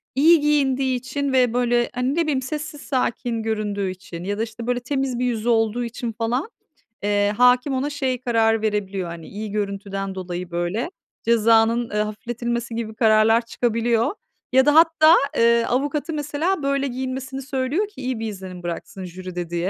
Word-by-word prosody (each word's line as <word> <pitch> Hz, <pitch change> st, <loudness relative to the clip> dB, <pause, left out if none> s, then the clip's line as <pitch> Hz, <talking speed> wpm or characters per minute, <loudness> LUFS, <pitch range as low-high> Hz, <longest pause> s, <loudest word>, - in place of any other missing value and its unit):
iyi 320 Hz, +4 st, +6 dB
giyindiği 270 Hz, -3 st, +2 dB
için 275 Hz, +2 st, -3 dB
ve 250 Hz, -3 st, +3 dB
böyle, 240 Hz, -1 st, +2 dB
hani, 255 Hz, +4 st, 0 dB
ne 340 Hz, -, +2 dB
bileyim, 290 Hz, -5 st, 0 dB
sessiz, 300 Hz, +2 st, -5 dB
sakin 235 Hz, -3 st, -1 dB
göründüğü 210 Hz, -3 st, -1 dB
için 185 Hz, -2 st, -8 dB
ya 205 Hz, +2 st, -2 dB
da, 225 Hz, -, 0 dB
işte, 230 Hz, +1 st, -7 dB
böyle 245 Hz, 0 st, +1 dB
temiz 265 Hz, -1 st, -2 dB
bir 250 Hz, -, +1 dB
yüzü 235 Hz, -1 st, -1 dB
olduğu 225 Hz, +1 st, +2 dB
için 235 Hz, 0 st, -4 dB
falan, 240 Hz, -, -2 dB, 0.5 s
eee, 205 Hz, 0 st, +2 dB
hâkim 250 Hz, +2 st, +4 dB
ona 270 Hz, +3 st, -1 dB
şey 260 Hz, -3 st, -2 dB
karar 225 Hz, -2 st, +2 dB
verebiliyor, 200 Hz, -4 st, -2 dB
hani, 170 Hz, -1 st, -8 dB
iyi 210 Hz, +1 st, -6 dB
görüntüden 195 Hz, -1 st, -3 dB
dolayı 180 Hz, -1 st, -5 dB
böyle, 175 Hz, -, -2 dB, 0.3 s
cezanın, 230 Hz, +1 st, +3 dB
eee, 210 Hz, -, -3 dB
hafifletilmesi 235 Hz, +2 st, -3 dB
gibi 220 Hz, -1 st, -4 dB
kararlar 225 Hz, +1 st, +4 dB
çıkabiliyor. 230 Hz, -, 0 dB, 0.4 s
Ya 265 Hz, +1 st, +6 dB
da 295 Hz, -, +4 dB
hatta, 325 Hz, 0 st, +7 dB, 0.2 s
eee, 235 Hz, 0 st, +4 dB
avukatı 290 Hz, +5 st, -1 dB
mesela 300 Hz, +3 st, -1 dB
böyle 275 Hz, 0 st, +1 dB
giyinmesini 265 Hz, +1 st, -4 dB
söylüyor 270 Hz, +9 st, -1 dB
ki 415 Hz, -10 st, -12 dB
iyi 255 Hz, -3 st, -2 dB
bir 225 Hz, -, -3 dB
izlenim 185 Hz, -3 st, -8 dB
bıraksın 175 Hz, +2 st, -6 dB
jüride 180 Hz, -1 st, -6 dB
diye. 175 Hz, +2 st, -1 dB
235 Hz, 170 wpm, -22 LUFS, 210-265 Hz, 0.5 s, hatta